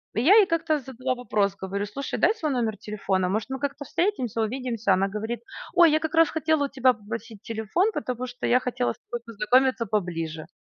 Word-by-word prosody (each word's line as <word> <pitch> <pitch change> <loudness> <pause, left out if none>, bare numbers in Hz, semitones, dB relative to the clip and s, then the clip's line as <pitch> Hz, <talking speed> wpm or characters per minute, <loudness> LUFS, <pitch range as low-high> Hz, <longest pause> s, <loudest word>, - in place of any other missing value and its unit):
И 225 - +1
я 345 - +6
ей 425 -3 +7
как-то 325 -2 +1
задала 255 -1 -3
вопрос, 205 -5 0
говорю: 195 +1 -3
"Слушай, 270 +7 -4
дай - - +4
свой 310 -9 -2
номер 230 -5 -1
телефона, 195 -3 -1
может, 215 +5 -2
мы 265 0 -4
как-то 285 +2 -3
встретимся, 260 - -1
увидимся?" 230 -3 0
Она 190 +1 +2
говорит: 220 +4 -4 0.3
"Ой, 340 -2 +7
я 310 - +3
как 315 0 -3
раз 330 0 +6
хотела 315 -1 +1
у - - -5
тебя 260 -1 +3
попросить 220 0 -8
телефон, 225 - 0
потому 250 +1 -3
что 245 0 -4
я 250 - +4
хотела 125 - -1
с - - -25
тобой 240 -1 -4
познакомиться 250 +2 +2
поближе". 165 -6 -3
240 Hz, 205 wpm, -25 LUFS, 210-280 Hz, 0.3 s, ей